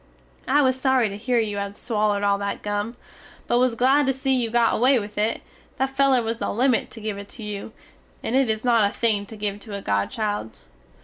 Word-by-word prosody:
I 290 +2 +4
was 260 0 +1
sory 260 -4 +3
to 200 - -6
hear 240 +4 -1
you 215 -3 0
had 200 0 -4
swallerd 210 -3 0
all 200 0 +2
that 200 0 -4
gum, 205 +3 -3 0.5
but 240 - +2
was 250 -2 +2
glad 265 +4 +3
to 270 - +3
see 265 +1 0
you 245 -3 +1
got 235 0 +3
away 255 +3 +4
with 210 -2 -5
it, 215 +2 -1 0.3
that 265 0 0
feler 270 -3 +3
was 225 +1 -3
the - - -2
limit 245 +2 +1
to 225 - -10
give 210 -2 -4
it 200 - -10
to 230 - -7
you, 210 0 -6 0.5
it - - -2
is 225 -5 +2
not 230 -4 +4
a - - -9
thing 210 -3 0
to 220 - -10
give 205 -1 -3
to 205 0 -8
a 200 - -4
godchild. 110 - -2
225 Hz, 225 wpm, -24 LUFS, 205-255 Hz, 0.5 s, I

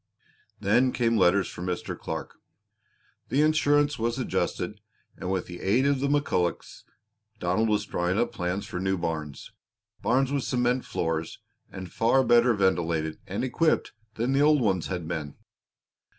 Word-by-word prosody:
Then 120 +6 +3
came 115 -2 +1
letters 100 -2 +3
for - - -9
Mr. 90 -1 -3
Clark. - - -6 0.9
The 145 +3 +3
insurance 145 -2 +2
was 115 +1 -1
adjusted - - -2 0.3
and 90 - -5
with 95 -2 -1
the 90 0 -9
aid 115 +8 +2
of 140 -1 +2
the 140 - 0
McCullochs, 140 - -1 0.5
Donald 95 +6 +1
was 105 0 +1
drawing 90 -1 -1
up 120 +1 +1
plans 95 -2 -3
for 90 - -5
new 95 +1 0
barns 80 -4 -4 0.5
barns 130 +3 +2
with 140 -2 0
cement 125 0 0
floors, 80 -1 -2 0.3
and 95 -2 -8
far 125 +4 +3
better 120 -1 +4
ventilated 85 -5 0
and 95 - -3
equipped 155 +5 +1 0.2
than 120 +4 0
the 140 - +3
old 150 0 +5
ones 95 -8 0
had 90 -4 -4
been. 75 -4 -4
105 Hz, 150 wpm, -27 LUFS, 90-130 Hz, 0.9 s, old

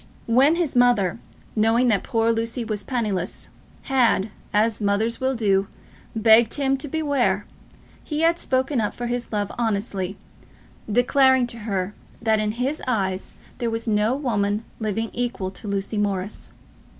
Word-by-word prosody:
When 265 +7 +4
his 335 -6 -1
mother, 240 -6 +3 0.4
knowing 225 +3 +3
that 205 -4 +2
poor 225 0 +1
Lucy 230 +1 -1
was 215 -2 -2
penniless, 205 -6 -3 0.3
had, 235 -6 +2 0.2
as 215 +1 +1
mothers 210 +4 0
will 260 0 +1
do, 200 -4 +2 0.5
begged 225 +1 +5
him 275 -2 +1
to 295 - -6
beware, 270 -10 0 0.6
he 300 0 -3
had 335 +1 +3
spoken 260 -1 0
up 210 - -2
for 245 - -4
his 240 0 -3
love 205 -2 -1
honestly, 200 -4 -1 0.7
declaring 260 +2 +4
to 235 -1 -6
her 190 0 -1 0.3
that 220 -1 +2
in 210 0 0
his 260 +6 -2
eyes 190 -6 -1 0.3
there 235 - 0
was 225 0 -3
no 215 +3 +2
woman 215 -6 -1
living 220 +1 -2
equal 235 -6 -2
to 210 - -9
Lucy 200 +1 -2
Morris. 200 -1 -2
225 Hz, 150 wpm, -23 LUFS, 205-250 Hz, 0.7 s, begged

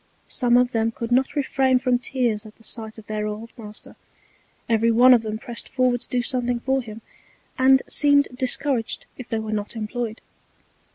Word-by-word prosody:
Some 245 -2 +2
of 250 0 +3
them 225 -1 +1
could 230 +1 -6
not 265 +4 +2
refrain 265 -2 +2
from 250 -1 +1
Tears 240 -4 -1
at 215 - -15
the 225 - -22
Sight 220 -1 -4
of 220 - -12
their 215 0 -3
old 215 +2 -6
Master; 210 -3 -9 0.7
every 230 0 +2
one 245 +3 +7
of 240 - +4
them 215 -1 -4
press'd 235 +1 -7
forward 250 -2 +1
to - - -7
do 245 -1 0
something 245 -1 0
for 265 +1 0
him, 225 -1 -10 0.6
and 265 0 +5
seemed 285 -1 +4
discouraged 255 -1 -1
if 250 - -8
they 225 - -1
were 220 0 -4
not 210 +2 -3
employed. 225 +1 -4
240 Hz, 185 wpm, -23 LUFS, 220-255 Hz, 0.7 s, one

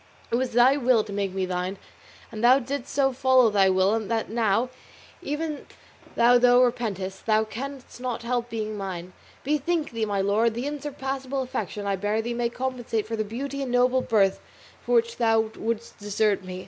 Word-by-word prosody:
It - - +2
was 250 0 -1
thy 250 +4 +5
will 250 -4 +3
to 210 -1 -8
make 200 -1 -1
me 190 0 -1
thine, 180 +1 -3 0.5
and 220 0 -6
thou 250 +2 +7
didst 275 +1 -4
so 270 -2 +2
follow 255 -2 +4
thy 195 -2 +4
will, 190 +4 +3
that 225 0 -2
now, 230 +2 +1 0.5
even 300 0 -4 0.5
though 240 +1 +5
thou 245 0 +6
repentest, 200 -6 -2
thou 215 0 +4
canst 255 +3 -8
not 250 -2 -3
help 240 0 -1
being 215 -2 -4
mine. 185 -3 -6 0.3
Bethink 300 +3 0
thee, 225 -2 -1
my 205 -2 -1
lord, 215 +4 +2
the 240 +3 -3
unsurpassable 270 -2 -3
affection 250 -5 -4
I 200 -1 0
bear 205 +3 -1
thee 240 +1 -3
may 235 0 0
compensate 245 -3 -3
for 225 - -4
the 215 - -1
beauty 275 +6 -5
and 265 -3 -3
noble 250 +1 +3
birth 200 -5 +2 0.4
for - - 0
which 465 0 +2
thou 225 -1 +2
wouldst 230 +1 -4
desert 205 -1 0
me. 185 0 -7
235 Hz, 185 wpm, -25 LUFS, 210-260 Hz, 0.5 s, thou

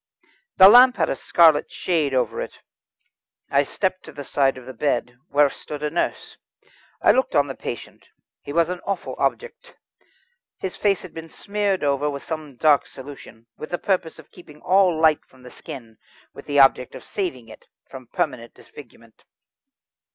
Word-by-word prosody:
The 190 -1 +10
lamp 245 +3 +8
had 160 -3 +1
a - - -1
scarlet 160 0 +4
shade 160 -6 -1
over 125 - 0
it. - - -7 0.9
I 140 - +4
stepped 185 +5 -2
to - - -10
the 145 - -8
side 135 -1 +1
of 130 - -11
the 130 - -9
bed, 125 -1 -1
where 145 +1 +4
stood 150 +1 -8
a 150 - -1
nurse. 170 - -3 0.7
I - - +7
looked 260 - 0
on 140 - +4
the 135 - -6
patient. 120 - -8 0.3
He 145 - -8
was 170 +2 +2
an 180 0 -4
awful 195 -2 -4
object. 485 +1 -3 0.8
His 190 - -5
face 200 -2 +1
had 185 - -11
been 165 0 -9
smeared 200 -1 -2
over 145 +1 +1
with 140 -1 -6
some 155 -4 -6
dark 150 +2 +3
solution, 130 -4 -12
with 155 - -8
the 175 - -2
purpose 180 -3 -1
of 160 -2 -16
keeping 150 -4 -15
all 185 -3 +3
light 160 -2 +3
from 130 -1 -22
the 125 - -12
skin, 120 -8 -10 0.4
with - - -13
the 145 - -1
object 135 -2 +4
of - - -10
saving 150 - -4
it 110 - -15 0.2
from 130 -2 -11
permanent 115 0 -3
disfigurement. 115 -5 -16
150 Hz, 175 wpm, -22 LUFS, 135-180 Hz, 0.9 s, The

